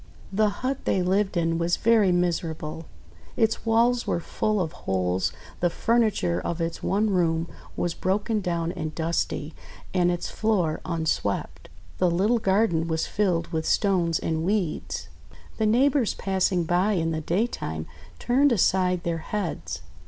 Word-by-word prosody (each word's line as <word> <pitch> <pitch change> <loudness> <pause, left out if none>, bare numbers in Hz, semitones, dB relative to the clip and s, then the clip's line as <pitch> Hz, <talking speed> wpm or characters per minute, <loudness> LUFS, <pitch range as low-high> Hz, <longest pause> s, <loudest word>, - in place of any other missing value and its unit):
The 215 +1 +3
hut 255 +6 -3
they 185 - +2
lived 190 +1 +1
in 165 -1 +1
was 170 +1 +1
very 220 -4 +4
miserable. 165 -2 -1 0.5
Its 225 +1 +1
walls 235 +2 +3
were - - +1
full 215 +5 -1
of 165 -4 -1
holes, 90 - -1 0.3
the 175 - +2
furniture 210 - +1
of 170 - -3
its 165 0 -3
one 210 +2 +1
room 165 -3 +1 0.3
was 175 -1 0
broken 205 +5 0
down 170 -2 -1
and 155 -4 -5
dusty, 160 -2 -2 0.4
and 180 -2 +3
its 175 -1 -1
floor 190 -8 0
unswept. 160 - -2 0.3
The 180 - +4
little 205 +8 +2
garden 190 -5 +2
was 160 -1 0
filled 180 -5 0
with 160 -2 -2
stones 175 -5 +2
and 160 0 -2
weeds. 190 -3 -1 0.5
The 220 - +2
neighbours 255 +1 +3
passing 190 -2 +1
by 180 +5 +2
in 165 -3 0
the 160 0 -2
daytime 160 - -2 0.3
turned 270 - +3
aside 185 -4 +2
their 170 -1 -1
heads. 145 - -4
175 Hz, 145 wpm, -25 LUFS, 165-210 Hz, 0.5 s, very